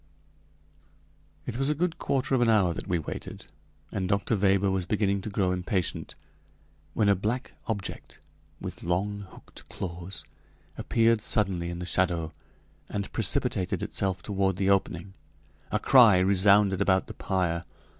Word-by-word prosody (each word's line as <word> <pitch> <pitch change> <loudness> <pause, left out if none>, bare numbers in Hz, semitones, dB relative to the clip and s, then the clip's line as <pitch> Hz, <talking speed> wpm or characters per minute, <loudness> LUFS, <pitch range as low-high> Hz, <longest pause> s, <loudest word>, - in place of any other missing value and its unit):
It 115 - -4
was 135 +1 +1
a 150 - +1
good 170 +1 -1
quarter 135 0 0
of 130 - +3
an 120 - +4
hour 100 -6 +3
that - - -7
we 90 - +1
waited, 80 - -7 0.5
and 95 -2 -2
Dr. 100 +2 +1
Weber 100 -1 +2
was 95 -2 -1
beginning 100 -2 +1
to 105 - -5
grow 95 -2 0
impatient, 90 0 -2 0.8
when 105 - +2
a 100 - +5
black 110 +7 -3
object, 100 -4 -5 0.4
with 95 -2 -7
long 100 +3 -2
hooked - - -15
claws, 90 +1 -6 0.5
appeared 115 -1 +2
suddenly 95 -6 0
in 85 - -5
the 90 - -5
shadow 85 -2 0 0.6
and 100 -1 -4
precipitated 90 -1 -1
itself 95 -2 -1
toward 95 -2 0
the 95 +1 +1
opening. 95 -1 -1 0.6
A - - +2
cry 120 -8 +6
resounded 100 +1 +4
about 95 -1 +3
the - - -8
pyre. 85 -3 -1
95 Hz, 145 wpm, -27 LUFS, 90-105 Hz, 0.8 s, cry